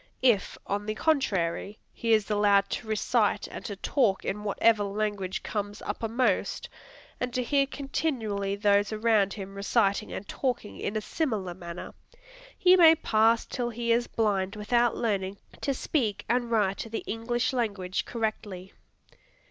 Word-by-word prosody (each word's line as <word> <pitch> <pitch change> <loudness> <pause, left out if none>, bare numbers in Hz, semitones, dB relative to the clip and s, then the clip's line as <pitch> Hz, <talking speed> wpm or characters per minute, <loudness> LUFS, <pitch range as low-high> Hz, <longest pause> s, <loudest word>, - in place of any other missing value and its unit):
If, 230 -6 +3
on 205 +1 -3
the 215 - -2
contrary, 205 - 0 0.2
he 230 - -2
is 215 -1 +3
allowed 200 -1 +3
to 225 - -4
recite 215 0 +1
and - - -8
to 205 - -4
talk 200 -1 +1
in 210 +1 -3
whatever 210 +1 +3
language 200 -2 -2
comes 205 -1 -4
uppermost, 230 +4 -1 0.5
and 250 0 -2
to 250 - +1
hear 275 +2 +2
continually 230 -9 -2
those 205 0 +2
around 215 -2 +2
him 195 -2 -7
reciting 200 +1 +1
and 200 - -6
talking 250 -6 -3
in 205 - -3
a - - -1
similar 210 - -2
manner, 170 -1 -8 0.6
he 365 0 +6
may 325 -3 +8
parse 225 -5 +3
till 240 -1 -3
he 235 0 -2
is 240 +1 +2
blind 200 -2 0
without 235 +3 +1
learning 200 -4 -1 0.2
"to 280 - 0
speak 250 -5 -1
and 240 0 +1
write 205 -4 +1
the 225 - -4
English 240 +4 -1
language 200 -7 -1
correctly." 210 -5 -4
215 Hz, 150 wpm, -28 LUFS, 200-240 Hz, 0.6 s, may